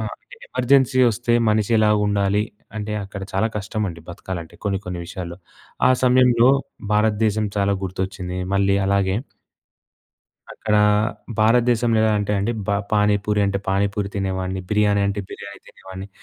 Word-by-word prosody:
ఆ! - - -3 0.5
ఎమర్జెన్సీ 130 0 +3
వస్తే 120 +2 -1 0.2
మనిషి 105 +1 +1
ఎలా 110 0 +4 0.2
ఉండాలి. 100 0 +1 0.3
అంటే 105 0 -4
అక్కడ 100 0 -8
చాలా 95 +3 +1
కష్టమండి 100 -4 -3
బతకాలంటే 85 -1 -7
కొన్ని 100 -2 0
కొన్ని 90 -1 -5
విషయాల్లో. 85 -1 -7 0.5
ఆ - - +5
సమయంలో 125 -1 +5 0.4
భారతదేశం 105 0 +2
చాలా 100 0 +2
గుర్తొచ్చింది. 95 -1 -4 0.2
మళ్ళీ 100 0 +2
అలాగే 100 -1 +1 1.4
అక్కడ 105 -1 -2 0.6
భారతదేశంలో 115 +1 +3
ఎలా 110 -1 +3
అంటే 105 0 -1
అండి. 100 +4 0
బ - - -17 0.2
పానీ 105 -1 +3
పూరి 105 -1 +1
అంటే 100 0 -1
పానీ 100 +1 +2
పూరి 100 -1 -1
తినేవాడిని. 95 -1 -2
బిర్యానీ 105 -1 +2
అంటే 100 +1 -2
బిర్యానీ 100 0 -9
తినేవాడిని. 95 +1 -10
100 Hz, 135 wpm, -21 LUFS, 95-110 Hz, 1.4 s, ఆ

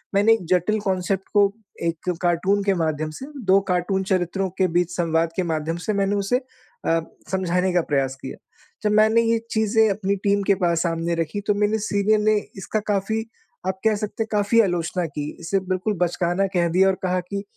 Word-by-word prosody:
मैंने 205 +3 +5
एक 225 -5 -1
जटिल 185 +4 +2
कांसेप्ट 190 0 -1
को 205 -1 +6 0.4
एक 165 +1 -2
कार्टून 185 +3 +1
के 195 -1 +2
माध्यम 155 -1 -1
से 265 - -6 0.2
2 190 +1 +5
कार्टून 180 +2 0
चरित्रों 185 +1 0
के 190 - +3
बीच 175 0 +2
संवाद 165 -1 +1
के 185 - 0
माध्यम 160 +1 -2
से 215 - 0
मैंने 200 0 +1
उसे 200 +5 +1 0.5
अ, 165 0 +3 0.3
समझाने 185 0 +1
का 175 - +3
प्रयास 135 -3 -1
किया। 130 - -7 0.5
जब 210 - +2
मैंने 220 +2 +5
ये 230 0 +2
चीज़ें 220 0 +3
अपनी 200 0 0
टीम 200 0 +3
के 200 - +5
पास 170 -1 +2
सामने 170 0 -1
रखी 165 +4 -2
तो 205 - +4
मेरे 210 +1 +1
सीनियर 210 0 +1
ने 215 +1 +3 0.2
इसका 205 +3 -2
काफ़ी, 220 +3 -1 0.4
आप 190 0 -2
कह 220 -1 +4
सकते 210 +1 -3
हैं - - -10
काफ़ी 210 +2 +4
आलोचना 175 -2 -1
की। 150 -1 -5
इसे 170 +4 0
बिल्कुल 185 +3 0
बचकाना 175 +2 +1
कह 170 -1 +3
दिया 185 +3 +4
और 190 - +1
कहा 185 0 +1
कि 200 0 -3
190 Hz, 195 wpm, -23 LUFS, 170-205 Hz, 0.5 s, को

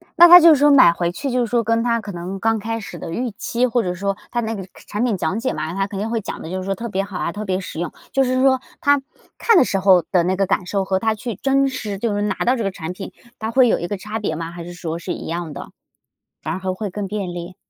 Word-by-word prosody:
那 345 0 +9
她 350 +1 +11
就 335 -1 +7
是 310 - +8
说 290 0 +5
买 260 -11 +7
回 170 0 -1
去 275 +9 -4
就 250 - +1
是 - - -8
说 240 -1 +1
跟 230 +1 +1
她 235 -1 +1
可 205 -2 -7
能 180 +2 -6
刚 225 +1 +1
开 225 +2 -3
始 200 -6 -8
的 165 - -7
预 245 +6 -2
期， 235 +4 -1
或 240 -1 +1
者 180 - -2
说 195 +2 -2 0.2
它 240 - -1
那 225 0 -3
个 190 -3 -6 0.2
产 210 +3 -2
品 235 -5 +1
讲 185 +5 -1
解 260 +3 -1
嘛， 155 +2 -4
他 195 +1 -1
肯 195 -1 -6
定 220 +2 -2
会 230 -1 -1
讲 - - -6
得 160 - -7
就 185 - -3
是 - - -7
说 195 0 -1
特 230 +4 -6
别 195 -1 -1
好 195 -2 -7
啊、 - - -2
特 210 +4 -6
别 185 -1 -1
实 185 - -7
用。 170 -2 -3 0.2
就 270 0 +3
是 255 0 +1
说 260 -1 +4 0.2
她 285 -3 +3 0.4
看 455 -5 +4
的 - - +7
时 195 - 0
候 185 -2 +5
的 180 -3 +3
那 185 +2 +1
个 195 +1 +1
感 185 -1 0
受 195 +1 -1
和 190 0 0
她 220 +1 +1
去 225 0 -5
真 275 +3 +2
实， 220 -7 -4
就 220 +1 -1
是 205 - -1
拿 205 -1 0
到 250 - +3
这 235 - -2
个 195 - -1
产 180 -2 -6
品， 195 +1 -8 0.3
它 220 +1 -3
会 255 +1 +5
有 - - +2
一 175 - -3
个 205 - -3
差 215 +3 -5
别 160 -7 -2
吗？ 165 +1 -5
还 170 0 -8
是 175 +1 -8
说 170 -1 -5
是 - - -5
一 - - -7
样 165 -2 -4
的， 140 - -8 0.7
反 155 - -3
而 185 - -4
还 185 0 -2
会 205 +2 -4
更 200 +1 -4
便 195 -3 -4
利？ 175 +1 -7
200 Hz, 330 characters per minute, -20 LUFS, 180-235 Hz, 0.7 s, 她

